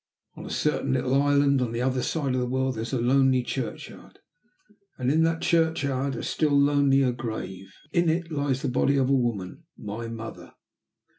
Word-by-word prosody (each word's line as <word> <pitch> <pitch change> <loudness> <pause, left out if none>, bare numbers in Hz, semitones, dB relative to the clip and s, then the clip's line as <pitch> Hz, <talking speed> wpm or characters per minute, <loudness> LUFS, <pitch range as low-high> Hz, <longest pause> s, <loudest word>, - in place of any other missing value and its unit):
On - - -9
a - - -7
certain 145 -3 0
little 130 +1 +2
island 140 -1 +3
on 120 -2 -2
the 115 - -2
other 130 0 0
side 140 -3 -1
of 130 - 0
the 125 - -1
world 130 +1 0
there 110 - -5
is 115 - -5
a 130 - 0
lonely 130 +1 +3
churchyard, - - -6 0.8
and 130 +1 0
in 160 +2 +3
that 165 0 -1
churchyard 140 -5 +1
a - - -5
still 145 -3 +1
lonelier 140 -2 +3
grave. 110 -6 -6 0.2
In 170 -2 +3
it 165 +1 -1
lies 140 -3 -1
the - - 0
body 140 +3 +2
of 135 0 +2
a - - +4
woman 120 - -2
my 110 +3 -6
mother. 115 0 -8
135 Hz, 190 wpm, -26 LUFS, 125-145 Hz, 0.8 s, a